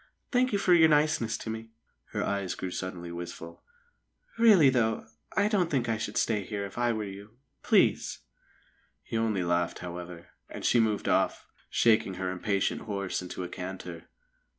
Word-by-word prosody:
"Thank 255 0 +3
you 205 - +2
for 190 -2 +3
your 160 -2 +7
niceness 150 -6 +2
to 110 - -5
me." 110 0 -7 0.4
Her - - -3
eyes 100 -2 -2
grew 95 - -5
suddenly 90 -2 -5
wistful. 85 -1 -8 0.8
"Really, 200 - +7
though, 110 -3 +1 0.3
I 205 - +4
don't 195 -6 +1
think 130 -6 0
I 115 -1 0
should 105 -1 -3
stay 105 -3 +1
there 100 -2 -3
if 100 - -10
I 120 0 +1
were 110 -2 -2
you. 100 +3 -9 0.2
Please!" - - +3 0.9
He - - -6
only 110 -4 +1
laughed, 85 0 0
however, 90 -1 -8 0.2
and - - -7
she 120 - +4
moved 110 -2 +1
off, - - +1 0.2
shaking 110 -4 +3
her 95 0 -2
impatient 95 +2 -1
horse 100 -4 -3
into 90 0 -6
a - - -4
canter. 90 -2 -7
105 Hz, 170 wpm, -29 LUFS, 90-120 Hz, 0.9 s, your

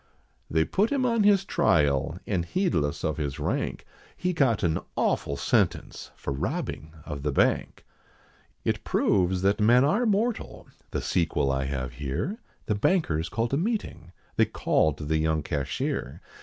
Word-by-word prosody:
They 80 0 +2
put 210 +4 +1
him 275 -3 +1
on 230 -2 +2
his 200 -2 +4
trial, 75 - +2
and 95 -4 0
heedless 85 - 0
of 80 -1 -1
his 70 -3 -3
rank, - - -2 0.3
He 180 0 -1
got 130 -10 +2
an 80 -2 +1 0.2
awful 70 - 0
sentence, - - 0
for 70 - -4
robbing 75 +3 -4
of 75 -3 -5
the 75 +1 -1
Bank. - - +1 0.8
It - - 0
proves 95 -1 +1
that 100 +2 +2
men 120 +5 +6
are 220 +12 +2
mortal, 220 +3 -1 0.2
the - - -2
sequel 80 -5 +1
I 65 0 -1
have 65 -2 -3
here, 70 - -3 0.3
The - - 0
bankers 100 - +1
called 115 +5 -1
a - - +3
meeting, 170 - -3 0.3
they - - +5
called 75 -1 0
the 80 +1 +2
young 80 -1 +1
cashier. 70 -1 -3
85 Hz, 155 wpm, -27 LUFS, -, 0.8 s, men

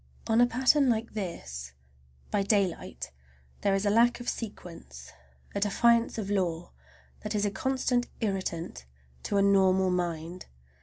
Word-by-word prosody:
On 225 +1 +3
a 245 - +6
pattern 260 +3 +3
like 230 0 -1
this, 65 - -6 0.6
by 205 - +2
daylight, 185 - -1 0.5
there 195 -1 +2
is 195 +1 -1
a 205 - +3
lack 235 +3 +4
of 245 - -8
sequence, 165 - -7 0.4
a - - -1
defiance 230 +4 +3
of 205 -2 -3
law, 175 -4 -1 0.5
that 210 0 -4
is 210 0 +1
a 205 - 0
constant 250 +2 0
irritant 185 - -3 0.3
to 200 - -1
a 200 - +4
normal 190 -1 +4
mind. 175 0 -3
200 Hz, 145 wpm, -29 LUFS, 175-230 Hz, 0.6 s, a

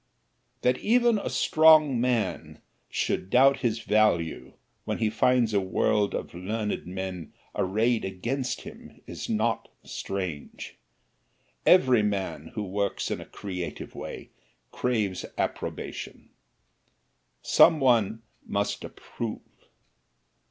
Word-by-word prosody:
That 125 0 +2
even 235 -1 +3
a - - -4
strong 155 -5 +5
man 115 -8 -1 0.3
should 90 - -1
doubt 135 +4 +5
his 115 -2 -1
value 105 -7 +1 0.3
when - - -3
he 110 -2 0
finds 120 -1 +2
a 100 - +4
world 100 +2 +1
of - - -5
learned 105 +3 -3
men 90 -3 -6 0.2
arrayed 110 +5 +1
against 120 +8 -3
him - - -12
is - - -7
not 110 0 0 0.2
strange. 95 -7 -5 0.9
Every 130 -10 +6
man 100 -2 -2
who 105 - -2
works 100 +1 -2
in - - -3
a - - -9
creative 90 -3 -6
way - - -8 0.4
craves 105 -7 -1
approbation. - - -5 1.1
Some 160 - +6
one 115 -4 +2 0.2
must 100 0 -2
approve. 115 -2 -6
110 Hz, 110 wpm, -27 LUFS, 95-125 Hz, 1.1 s, Every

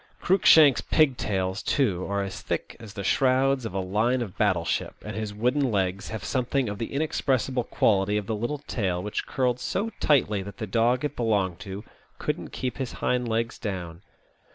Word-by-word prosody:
Cruikshank's 160 -7 +6
pigtails, 100 - +1
too, 100 -10 0
are 100 0 0
as 95 -2 -6
thick - - -3
as 110 -3 -11
the 100 - -4
shrouds 130 +3 +2
of 95 - -9
a - - 0
line 110 +7 +1
of 100 -6 -9
battle 95 -6 +1
ship, - - -2
and - - -5
his 110 -1 -3
wooden 125 +5 +1
legs 95 -1 -1
have 110 -3 -5
something 125 +6 0
of 105 -1 -4
the 115 - -4
inexpressible 135 -4 0
quality 100 -2 +2
of 105 - -2
the 110 - -2
little 120 +8 -2
tail 95 -10 -2
which 105 - -3
curled 125 -2 0
so 215 - -2
tightly 110 -9 +2
that 100 0 -9
the 110 - -3
dog 120 +6 +1
it 150 - -3
belonged 100 -7 0
to 100 0 -7 0.3
couldn't - - -3
keep 125 -1 -4
his 130 -2 -3
hind 125 -1 0
legs 115 +1 -1
down. 90 -5 -5
110 Hz, 185 wpm, -26 LUFS, 100-130 Hz, 0.3 s, Cruikshank's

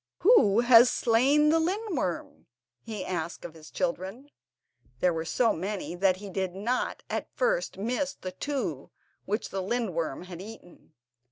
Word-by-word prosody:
"Who 235 - +6
has 240 0 +7
slain 270 +6 +3
the 325 +1 +4
lindworm?" 355 - -2 0.4
he 210 -4 -5
asked 170 -2 -4
of 165 - -8
his 160 -1 -13
children; 195 +12 -3 0.7
there 180 +3 +3
were 160 0 -3
so 230 +6 +2
many 190 +1 -4
that 185 +1 +2
he 205 +1 -9
did 185 -1 -2
not 235 +6 -2
at - - -3
first - - 0
miss 250 +7 -2
the 185 - -7
two 185 - -4 0.4
which 210 +4 -2
the 195 - -3
lindworm 185 - -2
had 180 -1 -9
eaten. 195 -6 -13
205 Hz, 150 wpm, -28 LUFS, 180-255 Hz, 0.7 s, has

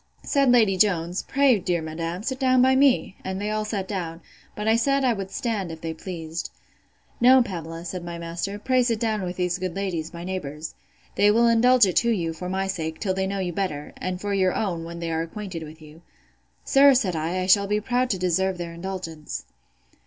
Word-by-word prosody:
said 275 -3 +2
Lady 220 -6 +4
Jones, 180 -2 +1
Pray, 270 -5 +4
dear 180 -2 0
madam, 165 +3 -4
sit 260 +2 -3
down 255 -1 +3
by 260 +1 +5
me: 265 -7 +3
and 190 0 -4
they 210 +1 -2
all 215 0 -1
sat 205 -3 -3
down: 170 -5 -4 0.4
But 210 +1 -4
I 220 - +5
said, 275 +4 +2
I 245 - +3
would 195 -3 -5
stand, 205 -6 -2
if 160 -1 -9
they 165 -1 -3
pleased. 165 -1 -6 0.7
No, 255 +1 +7
Pamela, 165 -5 -6
said 180 0 -5
my 170 0 -6
master: 170 +4 -4
pray 255 +4 +2
sit 235 -3 0
down 220 -2 0
with 180 -1 -4
these 180 0 -1
good 185 -2 -3
ladies, 175 -5 -3
my 170 0 -8
neighbours:—They 175 +3 -3
will 230 +3 +4
indulge 235 +1 +5
it 185 - -1
to 235 - +3
you, 170 -8 0
for 180 +3 -6
my 190 +1 -1
sake, 160 -4 -4
till 190 -3 0
they 190 0 -1
know 200 +1 -3
you 180 -2 -2
better; 155 -6 -3
and 185 -1 -4
for 205 +1 -3
your 185 -2 +2
own, 175 -6 -2
when 170 +1 -7
they 165 -1 -3
are 160 0 0
acquainted 175 +1 -6
with 155 0 -10
you. 155 +2 -14 0.6
Sir, 275 0 +6
said 195 -9 +1
I, 165 +4 -1
I - - -1
shall 200 +2 +4
be 210 +1 +1
proud 250 +3 0
to 195 - 0
deserve 185 +1 0
their 170 -1 -5
indulgence. 170 -3 -6
190 Hz, 215 wpm, -24 LUFS, 170-215 Hz, 0.7 s, No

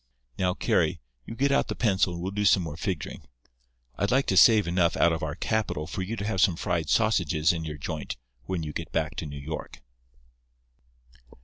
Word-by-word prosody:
Now, 90 -1 +1
Carry, 85 -3 +1 0.3
you 115 - -6
get 140 +4 +1
out 140 - +2
the - - -3
pencil, 95 -5 +1
and 85 - -6
we'll 95 - -2
do 105 +1 -2
some 95 -2 +4
more 80 -3 -5
figuring. 90 -4 -4 0.7
I'd 100 - +1
like 135 +2 +3
to 95 - 0
save 105 -1 +6
enough 85 0 +1
out 85 - +4
of 80 - -3
our 75 -2 -3
capital 110 -9 -1
for 95 - -5
you 100 +5 -3
to 100 - -4
have 95 -3 0
some 90 - +4
fried 85 -2 -2
sausages 90 -8 +2
in 80 -1 -4
your 75 -1 -5
joint 75 +1 -5 0.3
when 90 +1 -3
you 75 -1 -5
get 85 +1 -5
back 80 0 -1
to 80 - -4
New 70 0 -7
York." 75 +3 -7
90 Hz, 205 wpm, -27 LUFS, 80-100 Hz, 0.7 s, save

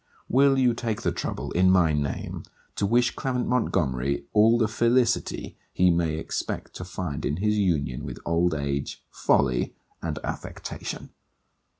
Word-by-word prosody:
Will 135 +2 +4
you 125 -2 +4
take 115 -2 -3
the - - +1
trouble, - - -4
in 95 +1 +4
my 90 -4 +4
name, 70 -2 -2 0.3
to 100 - 0
wish 120 +3 +2
Clement 125 -2 -1
Montgomery 70 - 0
all 110 +2 +5
the 115 -2 +2
felicity 120 +2 +1
he 90 0 +4
may 85 -2 +1
expect 80 - -4
to - - -6
find 90 -5 -4
in 75 - -1
his 105 +2 +1
union 75 -10 0
with - - -6
old 85 0 +2
age, 70 -1 -3
folly, - - +1 0.3
and - - -3
affectation? - - -6
95 Hz, 150 wpm, -26 LUFS, 75-115 Hz, 0.3 s, all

